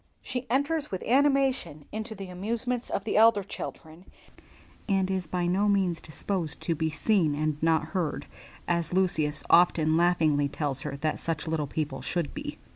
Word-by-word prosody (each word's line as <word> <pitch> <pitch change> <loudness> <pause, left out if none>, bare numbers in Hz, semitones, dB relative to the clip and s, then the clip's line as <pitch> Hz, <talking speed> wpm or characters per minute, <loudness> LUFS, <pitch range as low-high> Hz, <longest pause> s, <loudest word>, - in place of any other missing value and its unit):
She 255 -1 -4
enters 285 +4 +1
with 190 - -4
animation 270 - +2
into 220 +1 -5
the 195 -2 -8
amusements 230 +6 -3
of 195 - -2
the 220 - -2
elder 220 -2 +6
children, 160 0 -8 0.8
and 195 -1 +2
is 185 -3 -2
by 175 +2 -1
no 195 +4 +2
means 185 -5 +1
disposed 165 0 -3
to 170 - 0
be 160 0 -1
seen 160 -1 +1
and 150 0 -1
not 160 -1 +2
heard, 165 -2 -2 0.4
as 170 -1 0
Lucius 155 -5 +1
often 160 -2 +4
laughingly 160 -5 +3
tells 140 -2 -2
her 140 - -5
that 155 0 -1
such 165 -1 -3
little 160 -2 -1
people 135 -3 -3
should 165 +3 -2
be. - - -6
175 Hz, 165 wpm, -28 LUFS, 155-205 Hz, 0.8 s, elder